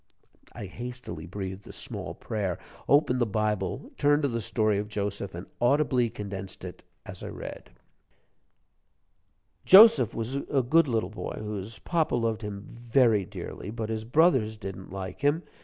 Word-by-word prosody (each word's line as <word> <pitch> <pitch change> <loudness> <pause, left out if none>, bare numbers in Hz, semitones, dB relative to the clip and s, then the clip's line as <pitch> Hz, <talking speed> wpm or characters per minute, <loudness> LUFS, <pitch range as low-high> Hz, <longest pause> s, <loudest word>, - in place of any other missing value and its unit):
I - - -7
hastily 120 -5 -7
breathed 95 +1 -6
a - - -8
small - - -6
prayer, 100 -5 -3 0.3
opened 135 -3 +4
the 120 - +3
Bible, 105 +2 -1
turned 145 +1 +3
to - - +3
the 115 -1 -2
story 110 -1 +1
of 105 - -3
Joseph, 100 -3 -3
and 85 - -6 0.2
audibly 125 -1 +3
condensed 95 -3 -7
it 90 - -8 0.2
as - - -9
I - - -6
read: - - -8 1.9
"Joseph 220 +4 +8
was 115 +4 -2
a 140 -1 0
good 160 +6 +4
little 110 -6 -1
boy 110 - -5
whose 105 0 -5
papa 165 -6 0
loved 115 -2 0
him 105 -1 -6 0.2
very 115 -6 +4
dearly. 95 - -7
But 110 0 -4
his 110 -1 -2
brothers 125 -4 +3
didn't 95 -3 -7
like 95 +2 -6
him. 145 +4 +2
110 Hz, 155 wpm, -28 LUFS, 100-130 Hz, 1.9 s, Joseph